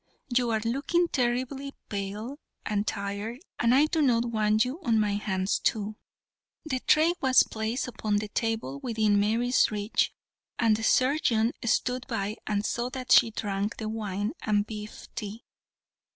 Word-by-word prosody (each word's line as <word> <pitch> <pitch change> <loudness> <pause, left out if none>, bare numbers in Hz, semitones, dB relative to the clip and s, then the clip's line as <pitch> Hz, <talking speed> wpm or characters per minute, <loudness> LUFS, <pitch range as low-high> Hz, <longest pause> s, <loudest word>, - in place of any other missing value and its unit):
You 245 -1 +3
are 220 -1 +1
looking 285 +9 +1
terribly 260 +2 -1
pale 210 +7 -5 0.3
and 210 0 -1
tired, 200 +4 -3 0.2
and 235 +1 +4
I 285 +3 +6
do 315 0 0
not 240 -4 +3
want 215 -1 +2
you 275 +8 -5
on 230 -7 +2
my 210 -1 +2
hands 195 -2 -1
too." 215 -1 -1 0.7
The 260 -4 -1
tray 315 +6 +4
was 260 -1 +6
placed 220 +4 -3
upon 215 -3 -2
the 210 0 -3
table 220 - -2
within 215 - +1
Mary's 230 +5 +3
reach, 210 0 0 0.5
and 225 -2 +3
the 220 - -4
surgeon 250 -3 +3
stood 250 +2 0
by 215 -3 -2
and 210 -1 0
saw 240 +1 -1
that 255 -1 -6
she 230 - +7
drank 205 -1 -3
the 215 -1 -4
wine 210 -2 -2
and 205 -1 +1
beef 210 -1 -8
tea. 220 0 -6
225 Hz, 155 wpm, -28 LUFS, 210-250 Hz, 0.7 s, she